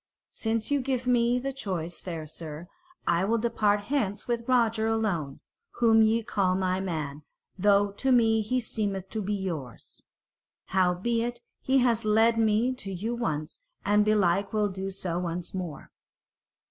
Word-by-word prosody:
"Since 225 +2 -2
ye 285 - +3
give 255 -1 -2
me 245 -1 +3
the 270 +2 -3
choice, 180 -9 -4
fair 165 -4 -5
sir, 155 +1 -8 0.4
I 170 +1 +2
will 225 +4 +2
depart 215 -3 +1
hence 210 -4 -2
with 235 -1 -2
Roger 230 -3 +3
alone, 195 -11 -1 0.3
whom 225 -2 +4
ye 225 +1 +3
call 190 -3 +1
my 185 0 0
man, 155 -6 -4 0.3
though 200 +1 +3
to 265 +6 -1
me 225 -3 +4
he 255 +4 0
seemeth 200 -5 -3
to 220 - -2
be 205 +1 -1
yours. 165 - -6 0.7
Howbeit, 230 +6 +1 0.2
he 265 +1 +2
has 235 -2 +2
led 225 +2 +3
me 225 +3 +2
to 195 -6 -6
you 205 +6 -3
once, 160 -10 -3 0.3
and 210 +1 +4
belike 200 -2 +2
will 210 -1 +2
do 190 0 -4
so 180 -3 -3
once 175 0 -4
more." 180 -5 -6
210 Hz, 155 wpm, -27 LUFS, 185-230 Hz, 0.7 s, whom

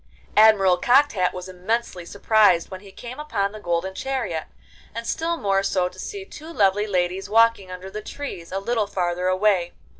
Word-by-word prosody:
Admiral 205 -4 +6
Cocked 270 +9 +4
Hat 185 -3 +1
was 180 0 -7
immensely 185 -1 -3
surprised 200 -4 +3
when 185 - -6
he 200 -1 -14
came 245 +6 -9
upon 205 -10 -1
the 215 - -9
golden 175 0 -2
chariot, 245 -9 -3 0.5
and 230 0 -5
still 335 +6 -1
more 195 -5 +1
so 185 -2 0
to 185 - -16
see 400 - -6
two 315 -3 -11
lovely 205 - +2
ladies 185 0 -1
walking 225 -3 +3
under 185 +1 -8
the 215 - -5
trees 205 -9 -7
a 190 - -2
little 215 +1 -1
farther 180 -2 -1
away. 185 -2 +2
200 Hz, 180 wpm, -23 LUFS, 185-230 Hz, 0.5 s, Admiral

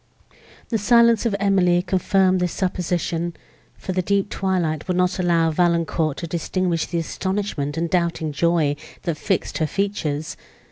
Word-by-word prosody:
The 225 - 0
silence 235 +1 +4
of 210 - -1
Emily 180 -3 +3
confirmed 185 0 +2
this 180 -1 -1
supposition; 175 -2 -2 0.4
for - - -5
the 185 0 0
deep 200 +2 0
twilight 175 -5 -1
would 180 -1 0
not 180 0 +1
allow 170 -2 +2
Valancourt 170 -2 +1
to - - -4
distinguish 170 +1 -1
the 175 - -3
astonishment 170 -4 -2
and 170 +1 0
doubting 170 -3 0
joy, 155 -1 +1 0.3
that 170 - -1
fixed 195 -4 -1
her 155 - +1
features. 160 -6 -2
175 Hz, 145 wpm, -22 LUFS, 165-190 Hz, 0.4 s, silence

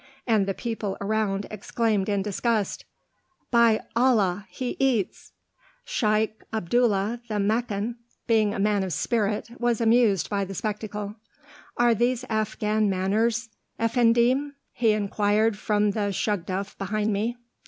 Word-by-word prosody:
and 215 -5 +2
the 195 - 0
people 220 -4 -3
around 205 -1 -1
exclaimed 215 -1 -1
in 200 -1 +1
disgust, 210 +1 -1 0.7
"By 235 -2 +4
Allah! 210 -6 +2
he 255 -1 -4
eats!" 255 -8 0 0.5
Shaykh 215 - 0
Abdullah, 220 +1 +1
the 215 -2 -2
Meccan, 220 +2 -1 0.3
being 220 -3 +3
a - - -4
man 205 0 +2
of 185 -3 -3
spirit, 210 +6 -1
was 240 -2 +1
amused 225 -4 +3
by 200 -1 -1
the 195 0 -6
spectacle. 210 0 -4 0.6
"Are 240 -1 +4
these 245 +2 0
Afghan 215 -1 0
manners, 220 +5 0 0.3
Effendim?" 240 +4 +2 0.2
he 225 -3 +2
inquired 210 +1 +1
from 210 0 +1
the 205 -1 -1
shugduf 195 0 -2
behind 210 +2 -1
me. 225 +4 -1
215 Hz, 125 wpm, -25 LUFS, 200-235 Hz, 0.7 s, By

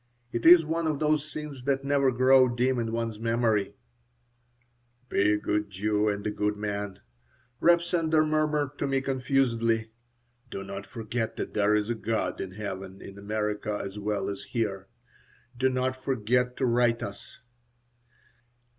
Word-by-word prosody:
It 115 +6 0
is 170 -1 +9
one 165 +1 -1
of 155 -2 0
those 155 0 0
scenes 145 -4 -7
that 135 -1 +1
never 140 -1 +2
grow 130 +1 +5
dim 125 +1 +1
in 115 -1 -2
one's 115 -2 -3
memory 115 -3 +1 1.3
"Be 105 +1 +3
a - - +2
good 105 0 -1
Jew 105 +2 0
and 100 0 -3
a 105 - 0
good 105 0 -1
man," 105 -2 -4 0.6
Reb 170 0 +5
Sender 160 -3 +2
murmured 150 -2 0
to 140 - 0
me, 135 -1 +1
confusedly. 125 -4 0 0.6
"Do 95 - -5
not 100 +1 -7
forget 115 0 -3
that - - -5
there 105 0 +3
is 105 +2 0
a - - +2
God 110 0 -2
in 95 -1 -6
heaven 95 -2 -6
in 100 0 -10
America 105 0 -2
as 100 +1 -6
well 105 0 -2
as 100 -1 -4
here. 100 -5 -3 0.7
Do 130 +2 +2
not 130 0 0
forget 125 -1 0
to 135 - +1
write 120 -1 +2
us." 100 - -8
115 Hz, 155 wpm, -28 LUFS, 105-135 Hz, 1.3 s, is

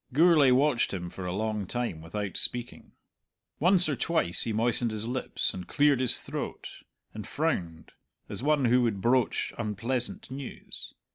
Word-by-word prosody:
Gourlay 155 -2 +5
watched 130 -4 +2
him 90 -2 -6
for 90 -1 -6
a - - -2
long 105 0 -2
time 120 -9 -3
without 95 +4 -5
speaking. 120 -1 -1 0.7
Once 180 +2 +5
or 145 - 0
twice 160 - 0
he 115 - -1
moistened 115 +2 +1
his 110 0 -4
lips, 125 +2 -1
and 90 -1 -7
cleared 145 -2 +3
his 130 -2 +5
throat, - - -6 0.3
and 110 -1 -7
frowned, 90 - -3 0.4
as - - -3
one 145 -1 +2
who 125 +1 +4
would 115 -5 0
broach 125 +4 +1
unpleasant 115 +4 -2
news. 135 -1 -8
120 Hz, 155 wpm, -28 LUFS, 105-135 Hz, 0.7 s, Gourlay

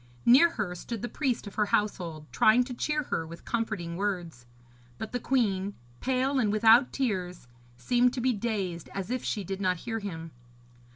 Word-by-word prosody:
Near 270 +8 +7
her 205 - -3
stood 210 +5 -6
the - - -1
priest 255 -4 -1
of 205 - -8
her 210 -1 +1
household, 175 -8 -1
trying 225 +3 +5
to 250 0 -7
cheer 300 +4 -1
her 165 -10 -3
with 170 +1 -11
comforting 215 -8 -2
words; 175 -11 -3 0.5
but 220 - -6
the 245 - -2
queen, 205 -7 0 0.2
pale 265 +1 +1
and 215 -5 +2
without 225 +4 +5
tears, 185 - -2 0.3
seemed 245 - +3
to - - -2
be 255 +1 +2
dazed 195 -6 -3
and - - -9
as 195 +3 -4
if 255 -1 -2
she 205 - -2
did 195 +2 -5
not 185 -1 +1
hear 225 -1 -2
him. 165 -6 -6
210 Hz, 185 wpm, -28 LUFS, 180-245 Hz, 0.5 s, Near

